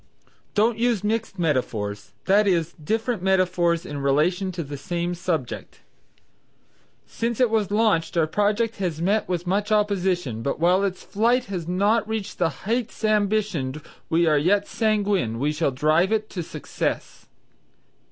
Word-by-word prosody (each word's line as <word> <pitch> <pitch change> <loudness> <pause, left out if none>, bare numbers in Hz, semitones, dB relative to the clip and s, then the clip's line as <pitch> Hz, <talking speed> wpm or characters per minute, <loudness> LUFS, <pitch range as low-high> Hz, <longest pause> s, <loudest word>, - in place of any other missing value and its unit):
Don't 220 +2 +2
use 235 -4 +1
mixed 215 -1 -1
metaphors, 110 - -2
that 200 +2 +4
is, 170 -3 +1
different 225 +4 -1
metaphors 180 -3 +2
in 145 -1 -5
relation 160 +8 +1
to 170 -1 -3
the 145 0 -7
same 175 +5 -3
subject: 170 -7 -4 1.2
"Since 230 0 -3
it 250 -3 +3
was 215 -4 +1
launched 205 -6 +1
our 165 - +4
project 210 +6 0
has 175 -5 -2
met 200 +5 +1
with 175 -1 -2
much 205 +4 0
opposition, 185 - +1
but 140 +5 -2
while 180 +4 +3
its 190 -2 -2
flight 240 +4 +1
has 170 -3 -4
not 205 +5 +2
reached 220 -2 -4
the 170 -2 +3 0.2
heights 230 +1 -2
ambitioned, 205 -10 +1 0.3
we 170 +1 +3
are 155 -2 +4
yet 200 +6 +2
sanguine 205 - 0
we 145 +5 0
shall 155 0 0
drive 155 +8 +2
it 215 -1 -1
to 180 - -3
success." 160 - -4
185 Hz, 150 wpm, -24 LUFS, 160-215 Hz, 1.2 s, that